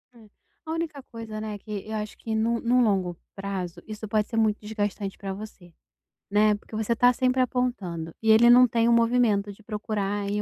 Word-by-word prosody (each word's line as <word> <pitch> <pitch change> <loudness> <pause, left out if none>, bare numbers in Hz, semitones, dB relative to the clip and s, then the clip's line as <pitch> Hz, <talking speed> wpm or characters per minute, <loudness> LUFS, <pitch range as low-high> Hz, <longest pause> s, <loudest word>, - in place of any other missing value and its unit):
É. 220 -3 -17 0.4
A 315 - -5
única 325 -3 -3
coisa, 225 -2 -6
né, 215 -1 -4
que 205 0 -6
eu 220 - -4
acho 210 0 -5
que, 220 -1 -4
no 230 +2 +1
no 245 +1 +3
longo 190 -6 +1 0.2
prazo, 195 -3 -5
isso 215 0 -7
pode 210 0 +1
ser 225 - -4
muito 220 -1 +2
desgastante 205 -2 -3
pra 195 -1 -5
você, 195 -4 -11 0.6
né. 210 +1 +4
Porque 210 +1 -11
você 220 +2 0
tá 245 +1 +5
sempre 255 +1 +1
apontando 205 -11 -2
e 220 0 +4
ele 230 +2 +7
não 250 +1 +8
tem 230 0 +1
o 235 - +5
movimento 230 -3 +2
de 200 - -15
procurar 210 -1 -3
aí, 205 +1 -1
215 Hz, 200 wpm, -26 LUFS, 205-235 Hz, 0.6 s, não